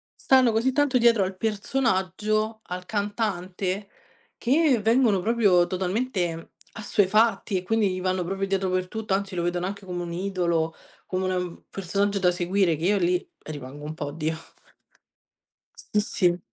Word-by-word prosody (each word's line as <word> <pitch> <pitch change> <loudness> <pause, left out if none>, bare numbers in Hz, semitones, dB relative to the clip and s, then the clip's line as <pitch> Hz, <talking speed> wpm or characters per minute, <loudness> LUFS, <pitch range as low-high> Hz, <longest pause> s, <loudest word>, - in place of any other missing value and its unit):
stanno 260 -3 +4
così 230 +4 +2
tanto 280 -1 +2
dietro 230 -4 +4
al 185 0 -5
personaggio, 215 -1 0
al 180 0 -5
cantante 200 -2 -2 0.5
che 275 0 +3
vengono 225 -2 +3
proprio 200 -5 +3
totalmente 185 -3 -2 0.3
assuefatti 210 -1 +2
e 180 - -3
quindi 210 -1 +1
gli 185 - -3
vanno 185 -1 0
proprio 195 +2 -2
dietro 195 -1 0
per 185 0 0
tutto, 220 -1 -3
anzi 195 -1 -1
lo 170 - -1
vedono 175 +1 -1
anche 200 0 -7
come 180 -1 -4
un 170 -1 -5
idolo, 170 -3 0 0.3
come 185 0 -2
una 185 0 0
un 180 -1 -5
personaggio 200 +2 -1
da 180 -1 +4
seguire 180 0 +1
che 165 - -3
io 205 +1 +3
lì 180 0 0 0.2
rimango 145 -1 -8
un 155 - -4
po': 150 - -5
oddio 155 +2 -2 1.6
Sì, 210 - +5
sì. 180 -4 +1
190 Hz, 155 wpm, -25 LUFS, 180-215 Hz, 1.6 s, Sì